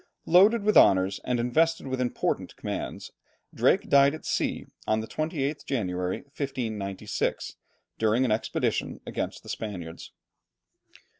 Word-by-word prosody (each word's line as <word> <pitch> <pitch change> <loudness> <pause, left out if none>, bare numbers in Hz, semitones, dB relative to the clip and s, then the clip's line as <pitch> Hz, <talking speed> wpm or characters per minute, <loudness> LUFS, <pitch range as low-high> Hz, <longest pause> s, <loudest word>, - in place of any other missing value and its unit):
Loaded 200 +6 +5
with 215 0 +2
honours, 95 0 +5
and 125 -1 0
invested 160 +8 +1
with 130 -1 -2
important 125 - -2
commands, - - -5 0.4
Drake - - +2
died 140 +1 +5
at 155 - -12
sea - - -1 0.2
on 110 0 +2
the 110 - -4
28th 150 +1 -2
January, 90 -7 -2
1596, 110 -9 -3 0.4
during 110 +4 +3
an 120 - 0
expedition 110 - -1
against - - -4
the - - -12
Spaniards. 90 -6 -6
125 Hz, 125 wpm, -27 LUFS, 105-145 Hz, 0.4 s, Loaded